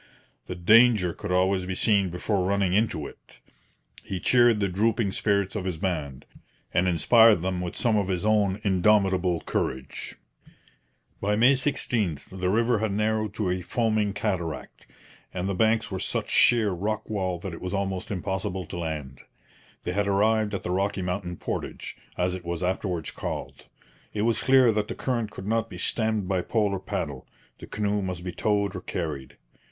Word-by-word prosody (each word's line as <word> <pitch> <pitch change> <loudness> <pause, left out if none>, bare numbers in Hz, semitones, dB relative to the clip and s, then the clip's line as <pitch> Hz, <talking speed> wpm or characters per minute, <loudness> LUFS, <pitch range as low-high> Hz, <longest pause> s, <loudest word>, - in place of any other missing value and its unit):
The 90 - -5
danger 105 0 +5
could 105 -3 -6
always 95 0 +2
be 95 - -3
seen 100 -2 +2
before 90 +3 -1
running 100 -1 +1
into 100 -8 +1
it. - - -13 0.7
He 95 - -4
cheered 120 +1 +4
the 100 - +1
drooping 105 +2 +1
spirits 100 0 0
of 100 - -2
his 90 -4 -2
band, 75 -7 -3 0.5
and 90 +2 +2
inspired 110 +2 +5
them 90 -1 -1
with 90 -1 -4
some 115 -3 +1
of 100 -2 0
his 95 +1 -2
own 105 -2 +2
indomitable 95 -2 +2
courage. 65 0 -4 1.1
By 105 +1 +1
May 120 +5 +5
16 125 - 0
the 90 -1 -2
river 115 +3 +2
had 110 -1 -1
narrowed 110 0 0
to 100 -4 -1
a 90 0 -2
foaming 110 0 0
cataract; 95 -7 -4 0.4
and 90 +1 -3
the 100 - -1
banks 110 +3 +1
were 95 - -3
such - - -2
sheer 115 -4 +5
rock 105 +4 -3
wall 95 -4 -2
that 90 +1 -7
it - - -9
was 90 +2 -3
almost 95 -2 -2
impossible 95 -1 -3
to 85 - -7
land. 75 -5 -5 0.6
They - - -2
had 100 +2 0
arrived 105 +1 +2
at - - -5
the 90 - -3
Rocky 95 +1 -1
Mountain 90 -1 -3
Portage, - - -5 0.2
as 90 0 0
it 90 -1 -6
was 85 0 -4
afterwards 90 -2 -2
called. - - -6 0.5
It 105 - 0
was 115 0 +1
clear 130 -3 +5
that 105 -1 -1
the - - -5
current 120 -4 -2
could 95 - -9
not 115 +1 0
be 90 - -8
stemmed 110 +1 0
by 95 -1 0
pole 105 +1 0
or 95 - -2
paddle; 70 -7 -5 0.3
the - - -10
canoe 105 -1 -1
must 90 -2 -4
be 90 - -4
towed 100 0 0
or 95 - -5
carried. 75 -9 -5
100 Hz, 180 wpm, -26 LUFS, 90-110 Hz, 1.1 s, danger